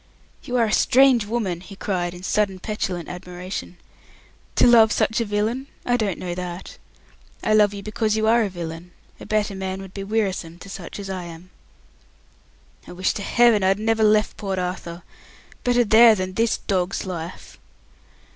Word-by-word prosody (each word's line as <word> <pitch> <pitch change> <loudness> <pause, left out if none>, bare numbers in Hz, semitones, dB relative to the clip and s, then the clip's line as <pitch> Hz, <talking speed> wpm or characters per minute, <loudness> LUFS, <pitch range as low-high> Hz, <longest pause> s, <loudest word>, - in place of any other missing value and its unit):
"You 250 - -5
are 235 - +4
a 215 - -2
strange 260 -4 +4
woman!" 205 -7 -2
he 195 +2 -11
cried, 180 -3 -2
in 180 - -11
sudden 195 -1 0
petulant 185 -4 -4
admiration. 180 - -7 0.8
"To - - +5
love 230 -3 +7
such 220 +2 +1
a - - 0
villain? 220 +6 -1 0.2
I 245 - +2
don't 210 -6 -1
know 180 -1 -4
that. 180 0 -7 0.6
I 215 - +2
love 210 -1 +5
you 200 -1 -8
because 215 +1 -1
you 220 - +1
are 230 +2 +4
a 210 - 0
villain. 170 -1 -7 0.3
A - - -10
better 210 -1 0
man 190 0 -4
would 195 -1 -10
be 195 - -5
wearisome 195 -5 -2
to 195 - -12
such 180 -4 -8
as 200 -1 -6
I 185 -2 -5
am." 170 +2 -11 1.4
"I - - -9
wish 185 +1 0
to - - -5
Heaven 235 0 +4
I'd 190 +1 +3
never 220 +1 +1
left 215 0 +3
Port 195 -2 -3
Arthur. 180 -1 -4 0.6
Better 245 0 +3
there 225 +1 +7
than 185 -1 -4
this 225 +2 +1
dog's 190 -1 -2
life." 175 -2 -7
195 Hz, 175 wpm, -23 LUFS, 180-220 Hz, 1.4 s, love